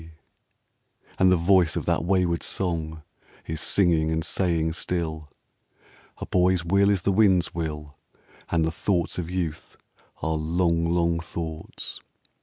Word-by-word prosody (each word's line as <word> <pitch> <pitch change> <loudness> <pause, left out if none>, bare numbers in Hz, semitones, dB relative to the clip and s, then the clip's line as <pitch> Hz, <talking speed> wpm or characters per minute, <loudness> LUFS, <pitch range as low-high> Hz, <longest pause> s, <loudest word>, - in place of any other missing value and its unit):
RAINBOW 80 - -13
GOLD 80 - -30
And 95 0 +5
the - - +6
voice 90 -1 +3
of - - -3
that - - +1
wayward 90 -2 +1
song 80 -4 -3 0.4
Is 80 0 -4
singing 85 -5 +2
and 80 0 -1
saying 85 -4 +1
still: 80 -3 -3 0.9
"A - - -6
boy's 90 -1 +2
will 100 +3 +3
is 100 -3 +1
the 100 - +2
wind's 95 -3 +3
will, 75 -3 -5 0.5
And 80 -2 +2
the 80 - -1
thoughts 90 0 -1
of 85 -1 -4
youth 85 -3 -4 0.5
are 80 - 0
long, 85 +1 0
long 85 -1 +1
thoughts." 80 -1 -6
85 Hz, 145 wpm, -25 LUFS, 80-90 Hz, 0.9 s, the